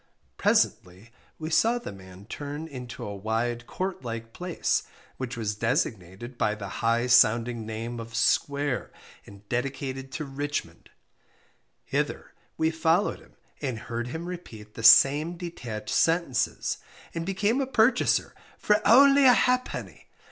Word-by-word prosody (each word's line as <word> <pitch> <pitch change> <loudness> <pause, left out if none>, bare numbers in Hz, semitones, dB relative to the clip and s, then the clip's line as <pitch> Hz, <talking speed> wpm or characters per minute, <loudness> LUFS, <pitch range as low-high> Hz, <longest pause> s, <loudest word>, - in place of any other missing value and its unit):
_ - - -38 0.3
Presently 95 +6 0 0.3
we 155 0 -5
saw 230 +8 +3
the 240 - -7
man 95 0 -13
turn 145 +6 -6
into 125 -5 -8
a 100 - -5
wide 115 +4 -2
court 185 -6 -4
like 115 -1 -6
place, 180 -1 -1 0.4
which 130 -1 -5
was 105 -2 -2
designated 110 +1 -2
by 105 - +1
the 100 -2 -7
high 115 +1 +2
sounding 120 -2 +3
name 115 +2 -5
of 115 0 -8
"SQUARE," 140 +3 +1 0.4
and 100 0 -15
dedicated 135 +2 -3
to 155 - -4
RICHMOND; 145 +2 -5 0.9
hither - - -3 0.2
we 160 0 +2
followed 165 +4 +1
him, - - -21 0.3
and 130 -5 -2
heard 120 +2 -5
him 160 +7 -5
repeat 115 -13 -9
the - - -8
same 145 +9 +6
detached 120 -12 -6
sentences, 165 -8 +1 0.3
and 165 - -3
became 205 +8 0
a 270 - -1
purchaser 240 -1 +2 0.2
for 210 - +3
_only 275 +6 +6
a 245 - +7
ha'penny! 250 +1 -1
125 Hz, 140 wpm, -27 LUFS, 115-165 Hz, 0.9 s, a